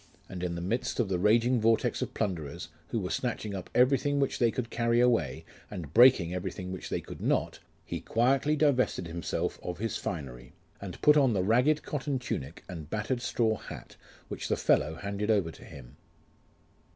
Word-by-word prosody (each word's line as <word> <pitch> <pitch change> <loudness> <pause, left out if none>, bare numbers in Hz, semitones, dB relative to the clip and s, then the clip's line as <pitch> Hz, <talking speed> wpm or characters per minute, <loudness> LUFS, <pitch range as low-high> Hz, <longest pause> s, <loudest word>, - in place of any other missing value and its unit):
And 90 -2 -7
in 90 -1 -2
the 85 - -4
midst 110 +10 -2
of 115 -5 +1
the 90 -2 0
raging 115 +5 +3
vortex 115 0 +2
of - - -4
plunderers, 85 -9 -3 0.2
who - - -2
were - - -4
snatching 105 -2 -2
up 95 - -6
everything 140 +3 +3
which 140 - 0
they 120 - +4
could 115 0 -4
carry 115 0 +1
away, 125 -1 +2 0.2
and 80 -5 -7
breaking 115 -9 +6
everything 90 +1 -4
which 95 - -6
they - - -2
could - - -10
not, - - 0 0.3
lie - - -2
quietly 135 +6 +2
divested 140 - +2
himself 85 +1 -3
of 90 -1 -5
his 110 +1 -2
finery, 65 -7 -6 0.3
and 95 -3 -7
put 150 0 +7
on 135 -5 +4
the 95 -3 +1
ragged 125 +9 +3
cotton 145 -1 -2
tunic, 85 - -5
and 80 -5 -8
battered 110 +5 -2
straw 110 -3 +1
hat, - - -10 0.3
which - - -5
the - - 0
fellow 75 +2 +2
handed 100 +4 -4
over 100 -7 +2
to - - -14
him. 65 0 -12
110 Hz, 185 wpm, -29 LUFS, 90-125 Hz, 0.3 s, put